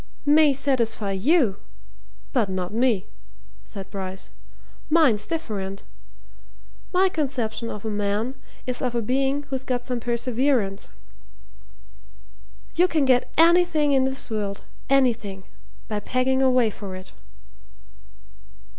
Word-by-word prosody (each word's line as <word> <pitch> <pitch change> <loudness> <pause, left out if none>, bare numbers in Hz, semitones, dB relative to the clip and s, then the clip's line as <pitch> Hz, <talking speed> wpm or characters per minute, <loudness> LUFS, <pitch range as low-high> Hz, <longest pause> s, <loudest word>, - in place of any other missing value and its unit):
"May 300 0 +6
satisfy 235 -7 0
you 230 - +2 0.8
but 200 - +2
not 185 +1 -3
me," 230 -4 +1 0.6
said 195 -2 -9
Bryce. 190 -1 -6 0.6
"Mine's 285 -10 +4
different. 200 -12 -4 1.1
My 375 +1 +4
conception 260 -9 -2
of 210 +1 -7
a - - -1
man 205 +4 -1 0.3
is 250 -1 -3
of 250 -2 -1
a 235 - +1
being 270 +4 0
who's 265 -1 -2
got 250 -2 -2
some 250 -2 -2
perseverance. 235 -3 0 1.8
You 355 +2 +4
can 315 -5 +1
get 255 -2 +2
anything 330 -3 +4
in 265 -1 +3
this 265 -2 -2
world 205 -2 -3 0.3
anything! 230 -8 +1 0.4
by 210 -1 -2
pegging 255 +4 0
away 255 -4 +3
for 195 -2 -8
it." 185 0 -10
245 Hz, 115 wpm, -24 LUFS, 205-275 Hz, 1.8 s, May